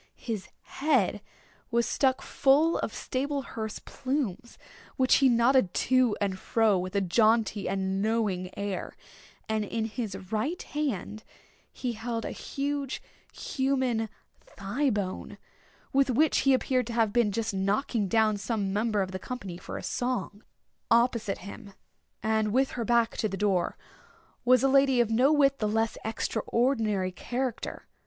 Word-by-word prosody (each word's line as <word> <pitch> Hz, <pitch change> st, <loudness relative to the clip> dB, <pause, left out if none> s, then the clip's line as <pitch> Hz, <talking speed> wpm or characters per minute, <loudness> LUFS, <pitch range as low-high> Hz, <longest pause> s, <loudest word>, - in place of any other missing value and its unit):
His 210 Hz, -7 st, -4 dB
head 260 Hz, -9 st, +1 dB, 0.5 s
was 235 Hz, -1 st, +2 dB
stuck 260 Hz, -2 st, +1 dB
full 290 Hz, +5 st, +3 dB
of -, -, -2 dB
sable 275 Hz, +2 st, -2 dB
hearse 220 Hz, -3 st, -5 dB
plumes, 255 Hz, -4 st, -4 dB, 0.4 s
which 260 Hz, -2 st, +5 dB
he 270 Hz, -1 st, +5 dB
nodded 235 Hz, -4 st, +3 dB
to 255 Hz, -4 st, +3 dB
and 195 Hz, -2 st, -1 dB
fro 225 Hz, -1 st, +2 dB
with 185 Hz, +2 st, -5 dB
a 200 Hz, -, +3 dB
jaunty 215 Hz, +2 st, +2 dB
and 190 Hz, 0 st, -1 dB
knowing 210 Hz, -4 st, 0 dB
air; 200 Hz, -3 st, -4 dB, 0.5 s
and, 220 Hz, -1 st, 0 dB
in 220 Hz, +2 st, -2 dB
his 220 Hz, -3 st, -4 dB, 0.2 s
right 270 Hz, +11 st, -1 dB
hand, 225 Hz, -, -3 dB, 0.5 s
he 245 Hz, -2 st, -3 dB
held 230 Hz, +1 st, -4 dB
a -, -, -3 dB
huge 280 Hz, -1 st, -3 dB, 0.3 s
human 260 Hz, -5 st, -1 dB, 0.3 s
thigh 245 Hz, +9 st, -2 dB
bone, 200 Hz, -5 st, -3 dB, 0.6 s
with 275 Hz, 0 st, +3 dB
which 295 Hz, +5 st, +3 dB
he 270 Hz, -1 st, +4 dB
appeared 255 Hz, -2 st, 0 dB
to 235 Hz, -, -5 dB
have 225 Hz, -3 st, +2 dB
been 235 Hz, -4 st, +3 dB
just 215 Hz, 0 st, -2 dB
knocking 200 Hz, +3 st, 0 dB
down 215 Hz, 0 st, +3 dB
some 200 Hz, -2 st, -2 dB
member 210 Hz, -1 st, +1 dB
of 185 Hz, -, -6 dB
the 185 Hz, -, -4 dB
company 195 Hz, -7 st, -6 dB
for -, -, -7 dB
a -, -, -7 dB
song. 245 Hz, -4 st, -3 dB, 0.5 s
Opposite 230 Hz, -3 st, +2 dB
him, 200 Hz, 0 st, -10 dB, 0.5 s
and 220 Hz, -1 st, +1 dB
with 265 Hz, +4 st, +2 dB
her 240 Hz, -, -3 dB
back 235 Hz, 0 st, +2 dB
to 215 Hz, -, 0 dB
the 195 Hz, -, -4 dB
door, 195 Hz, -4 st, 0 dB, 0.7 s
was 255 Hz, 0 st, +5 dB
a -, -, +5 dB
lady 270 Hz, -1 st, +4 dB
of 235 Hz, -2 st, +2 dB
no 255 Hz, +6 st, +4 dB
whit 275 Hz, -2 st, +3 dB
the 215 Hz, -, 0 dB
less 225 Hz, +1 st, 0 dB
extraordinary 220 Hz, -3 st, 0 dB
character. 245 Hz, +5 st, -4 dB
225 Hz, 150 wpm, -28 LUFS, 205-260 Hz, 0.7 s, which